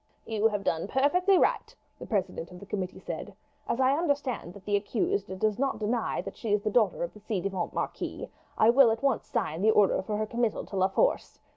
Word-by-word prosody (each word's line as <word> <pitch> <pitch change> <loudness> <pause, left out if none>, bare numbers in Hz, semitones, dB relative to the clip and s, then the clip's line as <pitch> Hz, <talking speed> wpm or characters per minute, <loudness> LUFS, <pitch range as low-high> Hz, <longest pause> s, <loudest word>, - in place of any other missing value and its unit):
"You 220 -1 +2
have 205 -2 -2
done 165 0 -1
perfectly 360 - +3
right," - - +1 0.2
the - - -8
president 190 -6 -2
of 180 -1 -11
the 200 - -11
committee 190 -2 -4
said. - - -7 0.3
"As 235 - 0
I 265 +1 +4
understand 285 - -1
that 200 -1 -13
the 205 - +1
accused 280 - -1
does 215 +2 0
not 275 -3 0
deny 220 +2 -1
that - - -7
she 225 - -4
is 205 0 +2
the 215 - 0
daughter 215 -6 +2
of 170 - -4
the 210 - -13
ci 210 -1 -2
devant 190 -1 -3
marquis, - - -4 0.3
I 220 - +6
will 260 -1 +6
at 225 +2 -2
once 275 -4 +1
sign 195 - -2
the 215 - +4
order 210 -3 +4
for 210 +2 -3
her 215 - 0
committal 235 0 -1
to - - -9
La 190 0 +3
Force. - - 0
215 Hz, 225 wpm, -28 LUFS, 195-255 Hz, 0.3 s, I